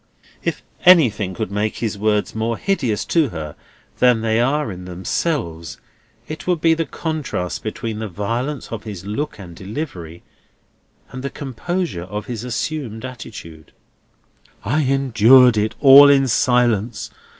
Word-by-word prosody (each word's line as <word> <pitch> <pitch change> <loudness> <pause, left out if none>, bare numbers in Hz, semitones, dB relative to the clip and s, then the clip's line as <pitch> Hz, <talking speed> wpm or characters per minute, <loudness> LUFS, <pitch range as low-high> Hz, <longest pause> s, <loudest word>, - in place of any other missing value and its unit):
If - - -3 0.2
anything 110 - +5
could 90 - -4
make 105 +1 -1
his 110 -4 -2
words 105 0 0
more 110 +1 -2
hideous 130 - -1
to 160 -5 +2
her 75 -5 -7 0.4
than 125 -3 +4
they 110 0 +1
are 135 -1 0
in 90 -1 -9
themselves, 90 - -3 0.5
it 155 +3 -8
would 180 -2 +1
be 165 +1 +4
the 165 -1 -2
contrast 150 - -4
between 110 0 -5
the 110 - -4
violence 115 - -4
of 115 -2 -5
his 100 -4 -8
look 110 +9 -4
and 90 -5 -11
delivery, 95 - -7 0.9
and 130 - -7
the 140 - -3
composure 145 - -4
of 105 +3 -6
his 120 -2 -5
assumed 125 -2 -4
attitude. 85 - -10 0.9
"I 140 +9 +1
endured 130 -2 +5
it 110 +1 -1
all 140 0 +9
in 135 -1 +4
silence. 120 -2 +1
115 Hz, 140 wpm, -20 LUFS, 105-140 Hz, 0.9 s, all